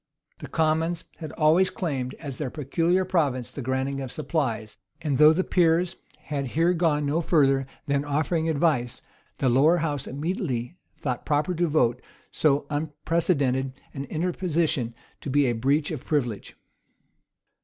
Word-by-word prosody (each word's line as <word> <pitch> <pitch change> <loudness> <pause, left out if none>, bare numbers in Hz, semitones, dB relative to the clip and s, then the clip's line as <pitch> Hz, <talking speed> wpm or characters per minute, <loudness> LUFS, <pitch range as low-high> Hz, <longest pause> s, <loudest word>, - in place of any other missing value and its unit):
The - - -7
commons 160 +1 0
had 155 -2 -7
always 165 +4 +4
claimed, 135 -8 -3
as 140 -5 -7
their 150 -4 -2
peculiar 165 +7 0
province 145 -9 0
the 140 - -6
granting 130 +2 -1
of 130 -2 -5
supplies; 115 -10 -2 0.2
and, 150 -6 -1
though 150 0 +9
the 180 +4 +1
peers 175 0 +2 0.3
had 140 -2 -3
here 170 +2 +4
gone 160 -4 +1
no 150 +4 +1
further 135 -5 +3 0.2
than 140 0 0
offering 160 +3 0
advice, 140 -6 0 0.3
the 135 - +1
lower 140 +8 +5
house 145 -4 -2
immediately 150 - -3 0.2
thought 125 -4 -3
proper 150 +4 +1
to 175 0 +1
vote 125 -6 +2 0.3
so 145 -2 +2
unprecedented 145 -3 0 0.2
an 135 0 -5
interposition 160 -5 -1 0.2
to - - -6
be 145 +1 +3
a 125 - +2
breach 140 +7 +1
of 150 -5 -5
privilege. 125 -9 -2
150 Hz, 145 wpm, -26 LUFS, 135-165 Hz, 0.3 s, though